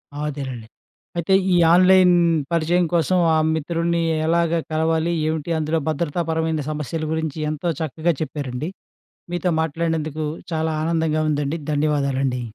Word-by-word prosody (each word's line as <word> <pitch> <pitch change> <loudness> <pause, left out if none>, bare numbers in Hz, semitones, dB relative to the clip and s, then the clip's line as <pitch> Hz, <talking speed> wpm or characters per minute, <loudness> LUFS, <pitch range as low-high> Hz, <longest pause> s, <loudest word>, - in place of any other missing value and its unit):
ఆ! - - -6
అదేనండి. 130 -6 -6 0.5
అయితే 170 +3 +1 0.2
ఈ - - +4 0.2
ఆన్‌లైన్ 185 0 +6 0.4
పరిచయం 170 +2 +2
కోసం 170 +2 +2 0.2
ఆ - - +3 0.2
మిత్రుడిని 170 +2 -1 0.2
ఎలాగ 170 0 +2
కలవాలి, 160 +1 +1 0.2
ఏమిటి, 155 0 -2
అందులో 155 +1 0
భద్రతాపరమైన 160 0 -1
సమస్యల 155 +1 -4
గురించి 160 -2 -3
ఎంతో 155 +3 -2
చక్కగా 160 +3 0
చెప్పారండి. 145 -1 -4 0.6
మీతో 175 +1 0
మాట్లాడినందుకు 160 -1 -2 0.3
చాలా 160 0 0
ఆనందంగా 160 -1 0
ఉందండి. 145 +1 -1 0.2
ధన్యవాదాలండి. 140 -3 0
160 Hz, 120 wpm, -22 LUFS, 150-170 Hz, 0.6 s, ఆన్‌లైన్